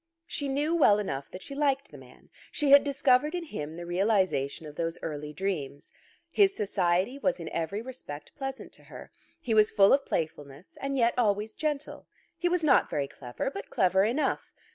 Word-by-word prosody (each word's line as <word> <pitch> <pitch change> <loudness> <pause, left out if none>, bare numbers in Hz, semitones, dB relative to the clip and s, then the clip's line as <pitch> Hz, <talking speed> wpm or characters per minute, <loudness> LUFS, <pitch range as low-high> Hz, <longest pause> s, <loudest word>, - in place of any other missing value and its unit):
She 285 -4 -3
knew 290 +4 0
well 210 -11 +5
enough 140 -10 -4
that 185 - -9
she - - -8
liked 280 -1 0
the - - -11
man. - - -18 0.2
She 290 -2 +1
had 280 0 +9
discovered 280 +2 +2
in 350 - -3
him 160 - -6
the 175 - -6
realization 180 -6 0
of 150 -1 -10
those 165 +1 -2
early 150 -1 -5
dreams. 150 -6 -4 0.4
His 395 -1 +4
society 195 +4 0
was 275 -7 0
in 165 - -6
every 195 +7 -3
respect 150 - -9
pleasant 270 -1 -6
to - - -15
her. - - -11 0.3
He 250 -8 -2
was 215 -1 +5
full 200 -2 +5
of 280 0 +3
playfulness, 150 - -4
and 275 0 -2
yet 235 -1 +3
always 210 -1 +1
gentle. 300 0 -4 0.3
He 350 - 0
was 355 -1 0
not 300 - +4
very 140 -1 -1
clever, 125 - -5
but 200 - -7
clever 190 0 +3
enough. 240 +8 -1
210 Hz, 185 wpm, -28 LUFS, 165-275 Hz, 0.4 s, had